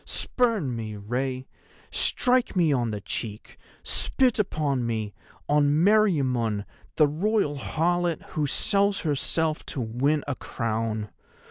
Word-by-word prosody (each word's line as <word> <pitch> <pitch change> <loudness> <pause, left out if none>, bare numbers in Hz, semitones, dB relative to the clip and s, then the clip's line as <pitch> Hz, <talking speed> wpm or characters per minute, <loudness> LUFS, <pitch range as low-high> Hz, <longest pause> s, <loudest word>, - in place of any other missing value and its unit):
Spurn 220 - 0
me, 110 -2 -5
Rei; 125 +5 -3 0.5
strike 250 -3 +2
me 165 -5 +3
on 120 -3 0
the 105 -1 -4
cheek, 105 +1 -6 0.2
spit 255 -4 +2
upon 150 -10 0
me, 110 -3 -2 0.3
on 145 0 +3
Meriamun, 135 - +2 0.3
the 155 - +5
Royal 160 -1 0
harlot 175 +3 0
who 150 -2 -1
sells 200 +6 +1
herself 155 +1 0
to - - -4
win 130 +6 0
a 145 - -1
crown. 110 -3 -3
145 Hz, 120 wpm, -26 LUFS, 115-175 Hz, 0.5 s, the